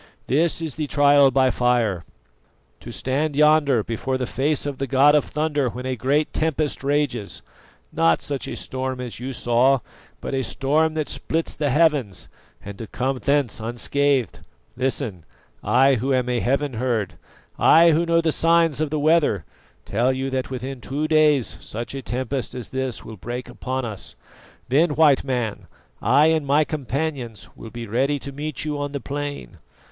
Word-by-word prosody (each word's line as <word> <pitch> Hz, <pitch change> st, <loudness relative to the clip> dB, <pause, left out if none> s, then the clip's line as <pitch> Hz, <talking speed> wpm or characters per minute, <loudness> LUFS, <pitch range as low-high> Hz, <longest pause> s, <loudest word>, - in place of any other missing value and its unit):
This 165 Hz, +4 st, +1 dB
is 160 Hz, -4 st, -3 dB
the 150 Hz, +1 st, -3 dB
trial 145 Hz, -1 st, +5 dB
by 130 Hz, 0 st, +3 dB
fire: 120 Hz, -8 st, +1 dB, 0.8 s
to -, -, -9 dB
stand 140 Hz, +3 st, -1 dB
yonder 150 Hz, -5 st, +4 dB
before 130 Hz, +4 st, -2 dB
the 130 Hz, -, -2 dB
face 140 Hz, +4 st, -1 dB
of 145 Hz, -2 st, -4 dB
the 135 Hz, -, -2 dB
god 135 Hz, +3 st, +5 dB
of 150 Hz, -, +4 dB
thunder 150 Hz, -3 st, -1 dB
when 125 Hz, +2 st, -7 dB
a 130 Hz, 0 st, -1 dB
great 140 Hz, +6 st, 0 dB
tempest 155 Hz, -3 st, -1 dB
rages 140 Hz, -7 st, -1 dB, 0.5 s
not 80 Hz, -1 st, +3 dB
such 140 Hz, -2 st, -4 dB
a -, -, -5 dB
storm 130 Hz, 0 st, -4 dB
as 125 Hz, -3 st, -6 dB
you 130 Hz, +2 st, -5 dB
saw, 125 Hz, +2 st, +3 dB, 0.4 s
but -, -, -5 dB
a 135 Hz, -, 0 dB
storm 155 Hz, +6 st, +1 dB
that 155 Hz, -2 st, -1 dB
splits 165 Hz, +1 st, -2 dB
the 145 Hz, -2 st, -1 dB
heavens 145 Hz, -, +1 dB, 0.4 s
and 100 Hz, 0 st, -8 dB
to 115 Hz, -, -6 dB
come 130 Hz, +3 st, -2 dB
thence 140 Hz, -4 st, 0 dB
unscathed. 130 Hz, +3 st, 0 dB, 0.4 s
Listen: 125 Hz, -, -2 dB, 0.4 s
I 135 Hz, +1 st, +4 dB
who 135 Hz, +2 st, -1 dB
am 125 Hz, -1 st, 0 dB
a 125 Hz, -1 st, +1 dB
'heaven 140 Hz, +3 st, 0 dB
herd,' 115 Hz, -4 st, -1 dB, 0.5 s
I 165 Hz, +1 st, +6 dB
who 160 Hz, +2 st, +2 dB
know 170 Hz, 0 st, +2 dB
the 165 Hz, -1 st, +1 dB
signs 165 Hz, -2 st, +3 dB
of 155 Hz, -, 0 dB
the 155 Hz, -, -2 dB
weather, 150 Hz, -, +2 dB, 0.4 s
tell 120 Hz, +5 st, +1 dB
you 130 Hz, +1 st, -3 dB
that 130 Hz, -1 st, -2 dB
within 130 Hz, 0 st, -6 dB
two 145 Hz, +5 st, -2 dB
days 150 Hz, -, +3 dB
such 115 Hz, +7 st, -6 dB
a 135 Hz, -, -5 dB
tempest 130 Hz, +1 st, -3 dB
as 125 Hz, -3 st, -6 dB
this 130 Hz, -3 st, -3 dB
will 110 Hz, -, -9 dB
break 120 Hz, +5 st, -6 dB
upon 130 Hz, 0 st, -4 dB
us. 105 Hz, -4 st, -7 dB, 0.5 s
Then 150 Hz, +4 st, +2 dB
White 150 Hz, -4 st, +4 dB
Man, 120 Hz, -6 st, -3 dB, 0.3 s
I 150 Hz, -, +4 dB
and 160 Hz, -2 st, +1 dB
my 145 Hz, +2 st, +3 dB
companions 140 Hz, -6 st, -4 dB
will 115 Hz, -, -10 dB
be 120 Hz, +1 st, -7 dB
ready 130 Hz, +7 st, 0 dB
to 140 Hz, 0 st, -8 dB
meet 150 Hz, +1 st, -4 dB
you 150 Hz, -1 st, -2 dB
on 145 Hz, 0 st, -4 dB
the 140 Hz, -, -2 dB
plain. 145 Hz, -, -6 dB
135 Hz, 175 wpm, -22 LUFS, 125-150 Hz, 0.8 s, I